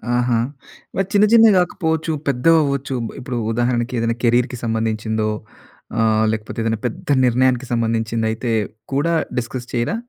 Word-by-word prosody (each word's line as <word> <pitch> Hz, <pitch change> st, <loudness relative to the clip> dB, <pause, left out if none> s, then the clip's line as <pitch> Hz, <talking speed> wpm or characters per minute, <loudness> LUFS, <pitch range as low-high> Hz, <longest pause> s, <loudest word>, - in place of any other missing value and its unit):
ఆహా! 120 Hz, -1 st, +2 dB, 0.6 s
మరి 195 Hz, -1 st, 0 dB
చిన్న 205 Hz, +1 st, +5 dB
చిన్నవి 225 Hz, -3 st, +7 dB
కాకపోవచ్చు 160 Hz, -3 st, -1 dB, 0.2 s
పెద్దవి 140 Hz, +5 st, +4 dB
అవ్వచ్చు. 140 Hz, -1 st, -2 dB, 0.2 s
ఇప్పుడు 125 Hz, -1 st, -4 dB
ఉదాహరణకి 120 Hz, +1 st, 0 dB
ఏదైనా 115 Hz, 0 st, 0 dB
కేరీర్‌కి 125 Hz, +1 st, +2 dB
సంబంధించిందో 110 Hz, -1 st, -1 dB, 0.7 s
ఆహ్, 110 Hz, 0 st, +3 dB
లేకపోతే 110 Hz, +1 st, -5 dB
ఏదైనా 115 Hz, 0 st, 0 dB
పెద్ద 115 Hz, -, -9 dB, 0.2 s
నిర్ణయానికి 125 Hz, +1 st, +2 dB
సంబంధించింది 115 Hz, -1 st, 0 dB
అయితే 115 Hz, +2 st, -3 dB, 0.4 s
కూడా 150 Hz, +5 st, +1 dB, 0.2 s
డిస్కస్ 125 Hz, 0 st, -4 dB
చేయరా? 120 Hz, -, 0 dB
120 Hz, 130 wpm, -20 LUFS, 115-140 Hz, 0.7 s, చిన్నవి